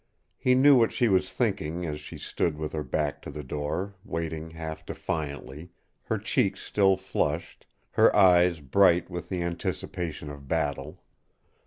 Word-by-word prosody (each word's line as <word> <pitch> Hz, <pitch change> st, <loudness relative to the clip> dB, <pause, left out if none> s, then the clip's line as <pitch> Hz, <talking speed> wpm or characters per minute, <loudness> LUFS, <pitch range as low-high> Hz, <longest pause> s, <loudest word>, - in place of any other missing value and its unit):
He 125 Hz, 0 st, +3 dB
knew 140 Hz, +2 st, +7 dB
what 115 Hz, -2 st, +4 dB
she 120 Hz, -, +2 dB
was 95 Hz, -2 st, +2 dB
thinking 90 Hz, -6 st, -1 dB
as 75 Hz, -2 st, -4 dB
she -, -, -9 dB
stood 80 Hz, -3 st, -2 dB
with 75 Hz, -1 st, -4 dB
her 75 Hz, -, -2 dB
back 75 Hz, -1 st, -2 dB
to -, -, -8 dB
the 75 Hz, +1 st, -7 dB
door, 75 Hz, +8 st, -3 dB
waiting 80 Hz, -1 st, -4 dB
half 80 Hz, -1 st, -7 dB
defiantly, 75 Hz, +1 st, -5 dB, 0.4 s
her -, -, -1 dB
cheeks -, -, 0 dB
still 95 Hz, -2 st, +3 dB
flushed, 95 Hz, 0 st, -3 dB, 0.2 s
her -, -, +4 dB
eyes 90 Hz, -4 st, +5 dB
bright 90 Hz, +5 st, +3 dB
with 85 Hz, 0 st, -6 dB
the 90 Hz, -2 st, -2 dB
anticipation 85 Hz, -2 st, -4 dB
of 70 Hz, -1 st, -11 dB
battle. -, -, -2 dB
85 Hz, 155 wpm, -27 LUFS, 75-95 Hz, 0.4 s, knew